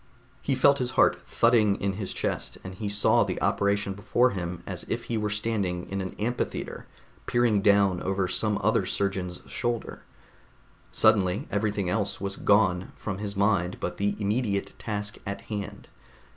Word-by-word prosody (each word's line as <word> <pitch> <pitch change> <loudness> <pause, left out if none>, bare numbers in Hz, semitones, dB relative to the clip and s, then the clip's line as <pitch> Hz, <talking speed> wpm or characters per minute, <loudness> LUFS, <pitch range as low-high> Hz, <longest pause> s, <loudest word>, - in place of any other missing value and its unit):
He 135 - 0
felt 140 +2 +5
his 125 -1 -1
heart - - +4
thudding 110 -4 +3
in 100 0 0
his 95 -1 -4
chest, - - -3
and 95 - -7
he 100 +2 -4
saw 105 +1 +4
the - - -3
operation 100 -1 +1
before 120 +5 +2
him 90 -2 -4
as - - -5
if - - -2
he 115 - -3
were 105 -1 0
standing 100 -4 -1
in 100 0 -1
an 95 - -5
amphitheater 120 +3 -3 0.4
peering 120 -4 +3
down 100 -3 +4
over 95 -1 0
some 105 +3 0
other 110 -2 +2
surgeon's 95 -3 -2
shoulder. 120 -2 -3 0.9
Suddenly 100 -1 +3
everything 105 -2 0
else 100 +2 -1
was 100 0 -3
gone 95 -3 +2
from 95 -3 -5
his 100 -1 -4
mind 100 -3 +1
but - - -4
the 100 0 0
immediate 105 -1 -1
task 105 -1 -4
at 100 - -4
hand. 100 -1 -5
100 Hz, 160 wpm, -27 LUFS, 95-110 Hz, 0.9 s, felt